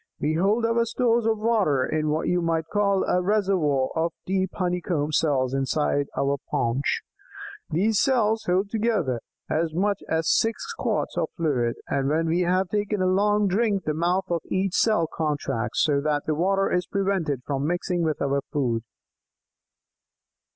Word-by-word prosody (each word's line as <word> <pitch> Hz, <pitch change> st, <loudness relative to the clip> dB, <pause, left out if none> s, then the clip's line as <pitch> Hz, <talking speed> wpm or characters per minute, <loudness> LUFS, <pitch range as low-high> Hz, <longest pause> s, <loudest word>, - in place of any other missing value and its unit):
"We 150 Hz, +2 st, 0 dB
hold 200 Hz, +8 st, +2 dB
our 230 Hz, 0 st, +2 dB
stores 235 Hz, -1 st, +1 dB
of 220 Hz, -1 st, +2 dB
water 210 Hz, -, +2 dB
in 155 Hz, -1 st, -1 dB
what 155 Hz, +2 st, -1 dB
you 180 Hz, 0 st, +1 dB
might 165 Hz, -1 st, 0 dB
call 200 Hz, -2 st, +2 dB
a 180 Hz, -, +1 dB
'reservoir' 180 Hz, -9 st, +1 dB
of 165 Hz, 0 st, 0 dB
deep 190 Hz, 0 st, 0 dB
honeycomb 175 Hz, -5 st, -1 dB
cells 135 Hz, -4 st, +1 dB
inside 140 Hz, +1 st, 0 dB
our 140 Hz, +1 st, +1 dB
paunch. 120 Hz, +4 st, 0 dB, 0.7 s
These 200 Hz, +6 st, +2 dB
cells 225 Hz, -4 st, +2 dB
hold 185 Hz, +3 st, +2 dB
altogether 205 Hz, -, -1 dB, 0.3 s
as 160 Hz, 0 st, -1 dB
much 200 Hz, +3 st, 0 dB
as 160 Hz, 0 st, 0 dB
six 230 Hz, -, +1 dB
quarts -, -, -2 dB
of -, -, -1 dB
fluid, 130 Hz, -8 st, 0 dB
and 135 Hz, -1 st, 0 dB
when 160 Hz, +2 st, +1 dB
we 165 Hz, +2 st, +1 dB
have 180 Hz, +1 st, +1 dB
taken 210 Hz, +1 st, -1 dB
a 185 Hz, -, +1 dB
long 205 Hz, +2 st, +2 dB
drink 200 Hz, 0 st, +1 dB
the 155 Hz, -, -1 dB
mouth 175 Hz, +4 st, 0 dB
of 170 Hz, -1 st, 0 dB
each 190 Hz, -1 st, -1 dB
cell 215 Hz, -7 st, +3 dB
contracts, 150 Hz, -7 st, -1 dB
so 145 Hz, -2 st, +2 dB
that 150 Hz, 0 st, -1 dB
the 155 Hz, -, 0 dB
water 195 Hz, +5 st, +1 dB
is 180 Hz, 0 st, 0 dB
prevented 190 Hz, -10 st, -1 dB
from 140 Hz, 0 st, -1 dB
mixing 175 Hz, +1 st, -1 dB
with 155 Hz, -4 st, -1 dB
our 140 Hz, 0 st, 0 dB
food. 120 Hz, -6 st, 0 dB
175 Hz, 165 wpm, -25 LUFS, 150-200 Hz, 0.7 s, cell